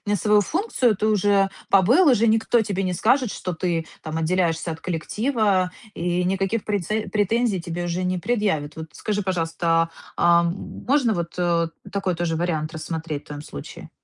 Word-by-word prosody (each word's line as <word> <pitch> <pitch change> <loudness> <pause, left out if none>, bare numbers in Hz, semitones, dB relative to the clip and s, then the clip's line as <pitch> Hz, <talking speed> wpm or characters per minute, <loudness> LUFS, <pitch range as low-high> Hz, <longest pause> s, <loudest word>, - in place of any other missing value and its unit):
свою 210 +2 +3
функцию, 265 - +1
ты 215 - 0
уже 200 -2 +3 0.2
побыл, 245 - +5
уже 230 -2 +4
никто 225 +1 +3
тебе 195 -2 -2
не 185 - -1
скажет, 245 +6 +2
что 180 - -4
ты, 165 -1 -2 0.2
там, 155 0 -4
отделяешься 165 0 0
от 160 - -8
коллектива 195 - 0 0.2
и 175 +1 0
никаких 195 +4 0
преце 210 +1 -1
претензий 215 -1 +1
тебе 175 0 -4
уже 175 +1 -2
не 180 0 0
предъявит. 195 -10 -1
Вот 160 0 -7
скажи, 205 -1 -2
пожалуйста, 165 -2 +1 0.3
а, 170 0 +4
можно, 230 +8 0
вот, 170 0 -4 0.5
такой 195 -2 -1
тоже 165 -1 -1
вариант 160 -2 -1
рассмотреть 160 -1 -4
в - - -25
твоём 145 0 -7
случае? 70 - -9
185 Hz, 160 wpm, -23 LUFS, 165-215 Hz, 0.5 s, побыл